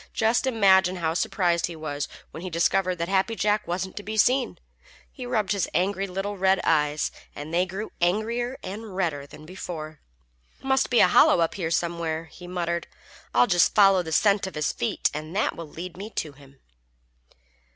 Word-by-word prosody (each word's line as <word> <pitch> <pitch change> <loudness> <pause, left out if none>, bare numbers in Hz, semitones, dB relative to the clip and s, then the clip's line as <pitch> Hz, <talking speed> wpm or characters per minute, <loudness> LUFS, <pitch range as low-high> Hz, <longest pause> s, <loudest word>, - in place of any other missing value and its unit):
Just 230 +4 +2
imagine 190 -6 +4
how 165 -3 -1
surprised 175 -1 +1
he 170 - -8
was 145 -2 -4 0.2
when 160 - -8
he 185 - -5
discovered 180 +2 +1
that 170 -1 -3
Happy 195 +4 +1
Jack 210 0 0
wasn't 185 +2 -3
to - - -3
be 215 +1 -5
seen. 250 +3 +2 0.5
He 255 -3 -8
rubbed 215 -6 0
his 200 -3 0
angry 195 +2 0
little 195 +2 -4
red 190 0 +3
eyes, 150 -1 +1 0.2
and 150 +3 -7
they 180 +2 +2
grew 195 +4 -6
angrier 230 +8 0
and 205 0 -7
redder 155 -7 -2
than 155 +2 -13
before. 155 -3 -7 0.6
"Must 265 0 +1
be 245 - +4
a - - +7
hollow 180 - +5
up 165 -1 +1
here 170 -5 -3
somewhere," 165 -1 -1
he 175 +2 -13
muttered. 170 -1 -2 0.5
"I'll 125 +1 +6
just 175 +4 +3
follow 195 -2 +6
the 160 -2 -7
scent 200 +4 +3
of 190 - -8
his 150 0 -1
feet, 120 - -1
and 155 +3 -6
that 210 - +1
will 165 -2 -8
lead 170 +3 -8
me 200 +4 -7
to 155 - -3
him." 140 -1 -19
180 Hz, 185 wpm, -25 LUFS, 165-205 Hz, 0.6 s, a